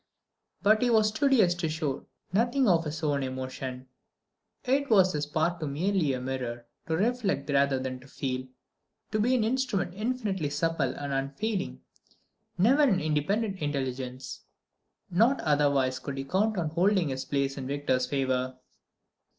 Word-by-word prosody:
But 215 +1 +5
he 250 - +3
was 220 -2 +4
studious 220 -6 +3
to 175 -2 -2
show 155 -4 -3 0.3
nothing 245 +5 +2
of 170 -4 +3
his 155 +1 -5
own 145 -2 +1
emotion. 130 0 -5 0.8
It 275 +2 +1
was 190 -4 +5
his 150 -1 -2
part 160 +3 0
to 155 - -3
be 140 - -4
merely 175 -2 +1
a 130 - -2
mirror, 125 -2 -4 0.2
to 160 0 0
reflect 205 - 0
rather 140 -1 +3
than 130 -1 -4
to 130 - -16
feel, 130 -1 -4 0.6
to 215 - 0
be 245 +4 +3
an 235 - +2
instrument 230 -6 0
infinitely 210 - -2
supple 150 -1 0
and 145 -1 -4
unfailing, 145 +10 -2 0.8
never 245 +11 +4
an 235 -11 +4
independent 190 +7 0
intelligence. 130 -3 -4 0.7
Not 230 +10 +3
otherwise 140 -3 +2
could 140 -1 -6
he 135 - -2
count 200 +9 0
on 165 -3 0
holding 180 0 +2
his 130 0 -3
place 140 -1 -1
in 130 -2 -5
Victor's 135 -2 0
favour. 130 -1 -1
155 Hz, 155 wpm, -28 LUFS, 135-210 Hz, 0.8 s, But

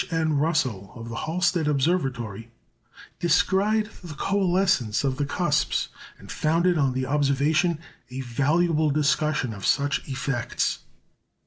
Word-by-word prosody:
N. 160 -3 0
Russell, 130 - -1
of 115 -1 -8
the 115 - -6
Halsted 175 -1 +1
Observatory, 130 - -1 0.7
descried 200 +5 +2 0.2
the 160 -4 -8
coalescence 180 - +1
of 135 -2 0
the 145 - -1
cusps, 150 -1 0 0.3
and - - -12
founded 170 +3 +2
on 140 -4 +1
the 130 0 -1
observation 150 +4 +1 0.3
a 130 +1 -5
valuable 155 +5 +1
discussion 150 -3 +1
of 100 -1 -10
such 140 0 +2
effects. 125 -3 -1
150 Hz, 120 wpm, -25 LUFS, 130-170 Hz, 0.7 s, descried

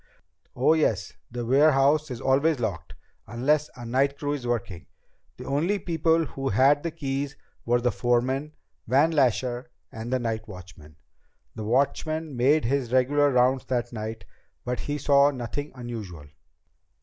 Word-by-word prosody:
"Oh, 130 +6 +4
yes, 110 -11 0 0.2
the 120 0 -5
warehouse 145 +3 +4
is 125 -2 -5
always 140 +4 +2
locked, 105 -8 -4 0.3
unless 145 +7 +1
a 120 - -9
night 135 +4 +1
crew 145 0 -2
is 130 -4 -5
working. 100 -8 -3 0.5
The - - -9
only 160 +9 0
people 165 -2 +1
who 135 -2 -4
had 135 +7 +4
keys 140 -2 -3 0.3
were 120 +1 +3
the 120 0 +1
foreman, 130 +5 0 0.3
Van 140 +7 +3
Lasher, 125 -3 0 0.2
and 115 +2 -7
the 130 - +2
night 115 -2 -3
watchman. 90 -6 -12 0.6
The 110 - -6
watchman 145 +5 0
made 135 +4 +3
his 130 -1 -1
regular 140 +3 +3
rounds 130 0 +2
that 120 -2 -2
night, 110 0 -6 0.4
but 125 0 -2
he 145 0 -3
saw 140 0 +4
nothing 145 +2 -5
unusual. 110 - -7
130 Hz, 145 wpm, -26 LUFS, 120-145 Hz, 0.6 s, Oh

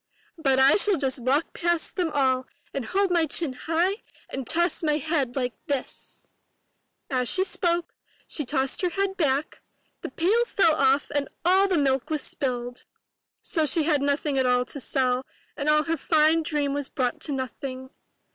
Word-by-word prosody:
But 270 -4 +2
I 265 +1 +6
shall 405 -2 +4
just 265 -2 0
walk 270 +6 0
past 345 -1 -1
them 360 -3 0
all 260 -2 +1 0.3
and 270 -4 -3
hold 390 - 0
my 335 -2 +2
chin 295 -1 0
high 335 - -1 0.3
and 265 -3 -5
toss 345 +1 +1
my 300 -2 +1
head 290 -5 -1
like 250 -3 -1
this 280 -3 -6
— - - -49
" - - -51
As 250 -2 +1
she 375 - +3
spoke, 345 -3 -1 0.3
she 300 - -2
tossed 265 0 -1
her 360 - +1
head 390 +2 -1
back, 290 -4 -1 0.4
the - - -5
pail 415 +8 +2
fell 390 -8 +3
off 275 -1 +2
and 285 -1 0 0.2
all 380 +3 +5
the 370 -3 +1
milk 270 -3 +1
was 310 -2 -2
spilled! 245 -2 -4 0.6
So 315 -3 0
she 315 +4 +3
had 300 -2 +2
nothing 285 0 0
at 260 - +2
all 250 0 +2
to 280 - -6
sell 255 0 0 0.3
and 295 0 -1
all 305 0 +4
her 330 +1 -1
fine 315 +2 +3
dream 295 -3 -1
was 285 -1 -2
brought 250 -3 -2
to 300 - -2
nothing. 260 0 -5
290 Hz, 185 wpm, -25 LUFS, 265-335 Hz, 0.6 s, I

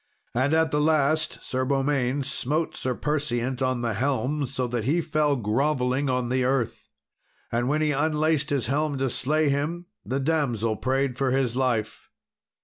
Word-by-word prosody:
And 130 +6 +2
at 160 -1 +2
the 150 - +2
last, 155 0 +1
Sir 130 0 -1
Beaumains 135 0 0
smote 145 +4 -1
Sir 125 -1 -1
Perseant 130 -4 -1
on 130 -2 0
the 115 -2 -1
helm, 140 +4 0
so 130 0 -2
that 120 -2 -2
he 155 +7 +2
fell 155 -3 +1
grovelling 130 +3 0
on 125 -1 0
the 130 +1 +1
earth. 130 -2 -1 0.6
And 120 +1 0
when 155 +2 +1
he 150 - +2
unlaced 155 +1 +1
his 140 -5 0
helm 145 +3 0
to 135 -2 0
slay 150 +5 +1
him, 150 +5 -1 0.2
the 135 +2 -2
damsel 130 -7 0
prayed 130 0 0
for 135 -1 +2
his 130 -2 +1
life. 125 -5 -1
135 Hz, 165 wpm, -25 LUFS, 125-150 Hz, 0.6 s, And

